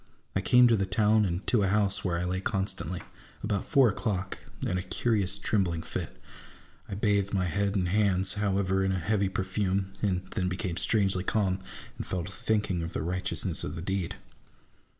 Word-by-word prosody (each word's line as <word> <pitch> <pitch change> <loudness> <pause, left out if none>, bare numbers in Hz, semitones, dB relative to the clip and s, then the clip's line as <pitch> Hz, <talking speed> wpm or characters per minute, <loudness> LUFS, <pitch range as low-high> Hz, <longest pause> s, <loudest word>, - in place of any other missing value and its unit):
I 95 - +2
came 125 +4 +6
to 115 - +4
the 95 -2 0
town, 105 +3 +3
and 90 +1 -2
to 120 - +3
a 100 - +2
house 100 -1 +1
where 85 -3 0
I 85 - -2
lay 90 +1 -1
constantly, 95 -4 -1 0.4
about 100 -2 -1
four 135 -2 +5
o'clock, 100 -3 -2 0.2
in 90 - 0
a - - -2
curious 100 0 0
trembling 90 -7 0
fit. - - -5 0.7
I - - -4
bathed 100 -1 +1
my 90 -1 +1
head 100 +3 0
and 90 -3 +1
hands, 95 -1 +3
however, 95 -2 +1
in 95 0 +1
a - - 0
heavy 100 +2 +1
perfume, 95 0 -1
and 95 -3 0
then 90 -4 -1
became 90 -1 -3
strangely 95 -3 +1
calm, 95 -2 0 0.4
and - - -5
fell 90 -2 -2
to 95 - -7
thinking 100 -2 0
of 85 +1 -5
the - - -2
Tightness 90 +2 -1
of 75 - -4
the 80 - -5
deed. 95 -2 -2
95 Hz, 190 wpm, -29 LUFS, 90-105 Hz, 0.7 s, came